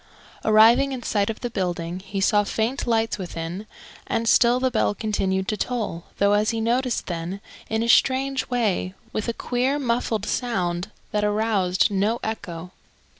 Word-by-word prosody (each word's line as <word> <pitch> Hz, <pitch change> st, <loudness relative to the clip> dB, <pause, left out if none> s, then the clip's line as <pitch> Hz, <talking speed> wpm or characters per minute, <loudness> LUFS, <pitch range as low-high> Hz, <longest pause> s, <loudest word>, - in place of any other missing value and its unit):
Arriving 225 Hz, +5 st, +5 dB
in 250 Hz, -2 st, -5 dB
sight 205 Hz, -2 st, 0 dB
of 220 Hz, -, -5 dB
the 245 Hz, -, -2 dB
building, 175 Hz, -3 st, -2 dB
he 195 Hz, +1 st, -5 dB
saw 205 Hz, +2 st, +3 dB
faint 225 Hz, +6 st, -2 dB
lights 225 Hz, -2 st, +1 dB
within; 175 Hz, +2 st, -5 dB, 0.4 s
and 230 Hz, 0 st, -1 dB
still 240 Hz, +2 st, +5 dB
the 260 Hz, 0 st, +1 dB
bell 220 Hz, -3 st, +1 dB
continued 190 Hz, -3 st, -1 dB
to 215 Hz, -, 0 dB
toll, 210 Hz, -8 st, -3 dB
though, 200 Hz, 0 st, +3 dB
as 210 Hz, +1 st, +2 dB
he 230 Hz, -, -1 dB
noticed 240 Hz, +2 st, 0 dB
then, 175 Hz, +2 st, -4 dB, 0.3 s
in 220 Hz, +1 st, 0 dB
a -, -, -1 dB
strange 265 Hz, +2 st, +3 dB
way, 210 Hz, -6 st, 0 dB, 0.2 s
with 215 Hz, -, -2 dB
a -, -, +1 dB
queer 255 Hz, +4 st, 0 dB
muffled 235 Hz, -5 st, -1 dB
sound 185 Hz, -7 st, -1 dB, 0.2 s
that 210 Hz, 0 st, 0 dB
aroused 210 Hz, -2 st, +1 dB
no 205 Hz, +4 st, +1 dB
echo. 180 Hz, -5 st, -5 dB
215 Hz, 165 wpm, -24 LUFS, 190-235 Hz, 0.4 s, Arriving